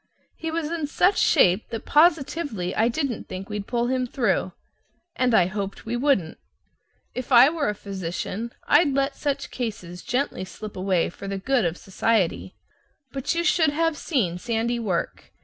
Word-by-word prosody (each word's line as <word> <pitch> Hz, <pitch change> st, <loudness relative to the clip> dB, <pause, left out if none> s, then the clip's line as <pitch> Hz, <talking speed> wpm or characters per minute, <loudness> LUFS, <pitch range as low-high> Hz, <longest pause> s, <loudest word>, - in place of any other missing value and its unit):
He 325 Hz, -, -4 dB
was 320 Hz, -1 st, -2 dB
in 325 Hz, -3 st, -2 dB
such 365 Hz, +6 st, +2 dB
shape 185 Hz, +4 st, +4 dB
that 225 Hz, -2 st, -5 dB
positively 290 Hz, -, +2 dB
I 225 Hz, -, +3 dB
didn't 255 Hz, -1 st, -2 dB
think 185 Hz, +1 st, -6 dB
we'd 210 Hz, -1 st, -4 dB
pull 240 Hz, -1 st, 0 dB
him 255 Hz, 0 st, 0 dB
through 230 Hz, -7 st, 0 dB, 0.6 s
and 250 Hz, -3 st, +2 dB
I 180 Hz, -, +5 dB
hoped 200 Hz, +1 st, -5 dB
we 230 Hz, +2 st, -2 dB
wouldn't. 240 Hz, -, +1 dB, 0.7 s
If 255 Hz, +1 st, -6 dB
I 250 Hz, +2 st, +8 dB
were 320 Hz, -8 st, -1 dB
a 210 Hz, -, -2 dB
physician, 195 Hz, +3 st, -5 dB
I'd 295 Hz, -1 st, +4 dB
let 275 Hz, 0 st, 0 dB
such 280 Hz, -1 st, -3 dB
cases 205 Hz, -8 st, -5 dB
gently 250 Hz, -6 st, -2 dB
slip 210 Hz, +3 st, -9 dB
away 185 Hz, -3 st, 0 dB
for 195 Hz, -, -9 dB
the 195 Hz, 0 st, -3 dB
good 245 Hz, +2 st, +1 dB
of 170 Hz, +1 st, -1 dB
society; 195 Hz, -1 st, 0 dB, 0.6 s
but 270 Hz, +3 st, -2 dB
you 340 Hz, -, +1 dB
should 335 Hz, -3 st, +3 dB
have 325 Hz, +2 st, 0 dB
seen 205 Hz, -, -1 dB
Sandy 235 Hz, +2 st, -1 dB
work! 190 Hz, -7 st, -3 dB
235 Hz, 165 wpm, -24 LUFS, 195-285 Hz, 0.7 s, I